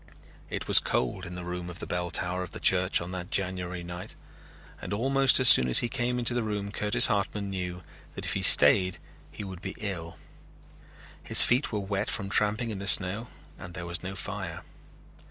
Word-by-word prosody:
It -, -, -6 dB
was -, -, +8 dB
cold 90 Hz, +9 st, -3 dB
in 90 Hz, -, -9 dB
the 90 Hz, 0 st, -8 dB
room 90 Hz, 0 st, -6 dB
of 90 Hz, -, -10 dB
the -, -, -7 dB
bell 90 Hz, 0 st, -4 dB
tower 90 Hz, +1 st, -1 dB
of 90 Hz, -, -8 dB
the -, -, -7 dB
church 95 Hz, 0 st, +2 dB
on 85 Hz, +1 st, -7 dB
that 90 Hz, -1 st, -7 dB
January 90 Hz, -2 st, -3 dB
night 85 Hz, +1 st, -9 dB, 0.7 s
and -, -, -6 dB
almost 135 Hz, +5 st, +2 dB
as 130 Hz, -, +4 dB
soon 65 Hz, -, +8 dB
as 60 Hz, -, +6 dB
he 120 Hz, -, +3 dB
came 125 Hz, -1 st, -2 dB
into 120 Hz, 0 st, +1 dB
the 120 Hz, -, -1 dB
room 105 Hz, -2 st, -4 dB
Curtis 105 Hz, 0 st, +4 dB
Hartman 100 Hz, 0 st, -2 dB
knew 90 Hz, -1 st, -6 dB, 0.3 s
that -, -, -6 dB
if -, -, -1 dB
he -, -, -3 dB
stayed 90 Hz, +5 st, +5 dB, 0.3 s
he -, -, -9 dB
would 95 Hz, -3 st, -9 dB
be -, -, -7 dB
ill. 90 Hz, -7 st, -7 dB, 1.0 s
His -, -, +6 dB
feet 125 Hz, +5 st, 0 dB
were 105 Hz, -, -2 dB
wet 100 Hz, +1 st, -3 dB
from 100 Hz, -2 st, -4 dB
tramping 105 Hz, +3 st, 0 dB
in 100 Hz, -, -6 dB
the 100 Hz, -, -7 dB
snow 100 Hz, +5 st, +1 dB, 0.3 s
and 90 Hz, -1 st, -10 dB
there 90 Hz, -, -7 dB
was 85 Hz, +1 st, -1 dB
no 95 Hz, +1 st, -7 dB
fire. 95 Hz, -4 st, -7 dB
95 Hz, 205 wpm, -27 LUFS, 90-105 Hz, 1.0 s, was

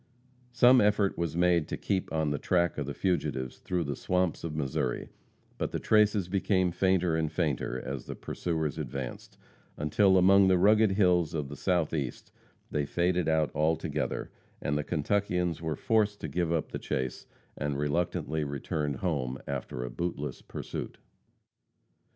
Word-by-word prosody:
Some 125 Hz, +1 st, +6 dB
effort 105 Hz, -1 st, +2 dB
was 85 Hz, -1 st, -2 dB
made 85 Hz, -3 st, +3 dB
to -, -, -4 dB
keep 95 Hz, -2 st, -2 dB
on 80 Hz, -2 st, 0 dB
the 70 Hz, -, -1 dB
track 85 Hz, -3 st, +1 dB
of 70 Hz, -, -3 dB
the 70 Hz, -, -3 dB
fugitives 70 Hz, -8 st, -1 dB
through 90 Hz, -2 st, -1 dB
the 70 Hz, -2 st, -3 dB
swamps 90 Hz, +2 st, 0 dB
of 80 Hz, -2 st, -4 dB
Missouri, 70 Hz, -4 st, -2 dB, 0.5 s
but -, -, -1 dB
the -, -, -3 dB
traces 105 Hz, -3 st, +3 dB
became 95 Hz, -1 st, +1 dB
fainter 90 Hz, -2 st, +2 dB
and 80 Hz, -1 st, 0 dB
fainter 75 Hz, -6 st, -1 dB
as -, -, -5 dB
the -, -, -5 dB
pursuers 80 Hz, -4 st, -3 dB
advanced, 65 Hz, -3 st, -6 dB, 0.4 s
until 95 Hz, +6 st, +3 dB
among 95 Hz, +1 st, +6 dB
the 95 Hz, -1 st, +5 dB
rugged 105 Hz, +2 st, +5 dB
hills 90 Hz, -5 st, +3 dB
of 75 Hz, -3 st, -2 dB
the 70 Hz, -, -7 dB
Southeast 80 Hz, -8 st, -1 dB, 0.4 s
they 75 Hz, -, 0 dB
faded 85 Hz, 0 st, +1 dB
out 80 Hz, -1 st, +2 dB
altogether, 80 Hz, +2 st, -1 dB, 0.3 s
and 70 Hz, -, -1 dB
the 75 Hz, -, 0 dB
Kentuckians 90 Hz, +1 st, 0 dB
were 80 Hz, -2 st, -2 dB
forced 105 Hz, +3 st, +1 dB
to -, -, -3 dB
give 85 Hz, +3 st, -1 dB
up 80 Hz, -2 st, -1 dB
the -, -, -4 dB
chase 65 Hz, -1 st, -3 dB, 0.3 s
and 75 Hz, 0 st, -2 dB
reluctantly 80 Hz, +1 st, -1 dB
returned 70 Hz, +1 st, -2 dB
home 65 Hz, -6 st, -2 dB
after 65 Hz, -2 st, -4 dB
a -, -, -5 dB
bootless 80 Hz, -1 st, -4 dB
pursuit. -, -, -6 dB
85 Hz, 155 wpm, -29 LUFS, 75-95 Hz, 0.5 s, Some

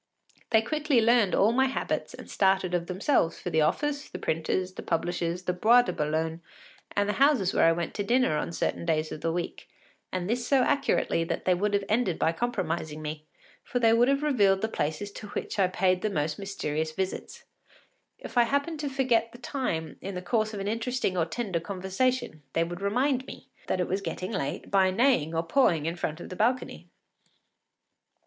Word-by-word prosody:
They 220 Hz, -1 st, +4 dB
quickly 300 Hz, 0 st, +1 dB
learned 230 Hz, -3 st, +4 dB
all 210 Hz, +3 st, +4 dB
my 265 Hz, +3 st, +3 dB
habits 265 Hz, -, -3 dB
and -, -, -11 dB
started 190 Hz, -2 st, +1 dB
of 175 Hz, -1 st, 0 dB
themselves 185 Hz, -, +1 dB
for 180 Hz, -, -5 dB
the 160 Hz, -1 st, +3 dB
office, 290 Hz, -, 0 dB
the -, -, -6 dB
printer’s, 180 Hz, +3 st, -1 dB
the -, -, -7 dB
publishers’, 175 Hz, +1 st, -2 dB
the 180 Hz, -, -1 dB
Bois 230 Hz, +7 st, +5 dB
de -, -, -3 dB
Boulogne, 160 Hz, +2 st, -1 dB, 0.5 s
and 205 Hz, 0 st, +2 dB
the 210 Hz, +5 st, -2 dB
houses 250 Hz, -11 st, +2 dB
where -, -, +4 dB
I -, -, +6 dB
went 170 Hz, 0 st, -2 dB
to 205 Hz, -, -2 dB
dinner 240 Hz, -6 st, +2 dB
on 150 Hz, -, -2 dB
certain 170 Hz, -, -2 dB
days 155 Hz, -2 st, 0 dB
of 150 Hz, -, -6 dB
the 165 Hz, -, 0 dB
week, 170 Hz, +1 st, -5 dB, 0.4 s
and 180 Hz, -1 st, -2 dB
this 240 Hz, +3 st, -1 dB
so 270 Hz, -2 st, +4 dB
accurately 275 Hz, -11 st, +1 dB
that 165 Hz, -, -3 dB
they 185 Hz, -, +4 dB
would 205 Hz, +3 st, 0 dB
have 200 Hz, -, +1 dB
ended 215 Hz, -6 st, +1 dB
by 160 Hz, -, +2 dB
compromising 165 Hz, -7 st, -3 dB
me, 155 Hz, 0 st, -6 dB, 0.4 s
for -, -, -3 dB
they 225 Hz, -2 st, +4 dB
would 235 Hz, +2 st, +4 dB
have 275 Hz, +1 st, +2 dB
revealed 200 Hz, -10 st, +3 dB
the 220 Hz, -, +1 dB
places 155 Hz, +7 st, -1 dB
to 210 Hz, -, -9 dB
which 205 Hz, -, -5 dB
I 190 Hz, -, +5 dB
paid 185 Hz, 0 st, +1 dB
the 215 Hz, -, 0 dB
most 150 Hz, -5 st, -2 dB
mysterious 160 Hz, -6 st, -3 dB
visits. 190 Hz, +3 st, -4 dB, 0.7 s
If 245 Hz, -, -2 dB
I 240 Hz, -, +6 dB
happened 285 Hz, +5 st, -1 dB
to 295 Hz, -1 st, -2 dB
forget 255 Hz, -4 st, +1 dB
the 240 Hz, -, -12 dB
time 240 Hz, -, -3 dB
in 195 Hz, 0 st, -5 dB
the 180 Hz, -, -5 dB
course 220 Hz, +1 st, 0 dB
of 210 Hz, -, -6 dB
an 195 Hz, -, -3 dB
interesting 230 Hz, -2 st, -1 dB
or 170 Hz, -2 st, +2 dB
tender 190 Hz, -2 st, -2 dB
conversation 190 Hz, +1 st, -2 dB
they 165 Hz, -, +2 dB
would 175 Hz, +2 st, -6 dB
remind 255 Hz, +6 st, +1 dB
me -, -, -11 dB, 0.2 s
it 180 Hz, -1 st, 0 dB
was 190 Hz, +2 st, -1 dB
getting 185 Hz, 0 st, -4 dB
late 170 Hz, -4 st, -4 dB
by 190 Hz, -1 st, +4 dB
neighing 185 Hz, -, +2 dB
or 165 Hz, -, +1 dB
pawing 165 Hz, -, +2 dB
in 165 Hz, +1 st, -1 dB
front 160 Hz, -2 st, -3 dB
of -, -, -8 dB
the 185 Hz, -, -6 dB
balcony. 245 Hz, +6 st, -1 dB
195 Hz, 200 wpm, -28 LUFS, 170-240 Hz, 0.7 s, I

